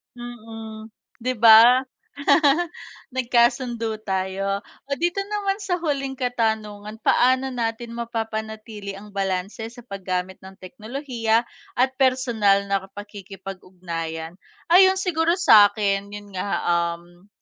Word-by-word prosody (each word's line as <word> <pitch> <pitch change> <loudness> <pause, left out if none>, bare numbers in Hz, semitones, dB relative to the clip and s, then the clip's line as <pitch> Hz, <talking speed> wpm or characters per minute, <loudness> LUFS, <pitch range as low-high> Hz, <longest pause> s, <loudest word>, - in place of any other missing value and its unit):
Mm, 225 -2 -9 0.3
di 255 +2 -1
ba? 230 +3 +8 1.3
Nagkasundo 240 -2 +1
tayo. 195 0 -2 0.3
Oh, 280 - 0
dito 350 +4 0
naman 400 0 -2
sa 375 -3 -1
huling 275 -5 -2
katanungan, 220 -4 -2
paano 260 +1 +3
natin 230 -1 -3
mapapanatili 220 -3 -5
ang 210 +1 -12
balanse 195 +2 -3
sa 245 +1 -13
paggamit 190 -3 -4
ng 190 0 -12
teknolohiya 230 +2 -2 0.3
at 260 +2 +2
personal 235 -7 +2
na 195 -1 +1
pakikipag-ugnayan? 185 -5 -7 0.4
Ayun 380 +2 +7
siguro 340 -2 +1
sakin 205 - +4
yun 205 -1 -10
nga 185 - -3 0.5
um. 175 +2 -20
220 Hz, 105 wpm, -23 LUFS, 200-255 Hz, 1.3 s, ba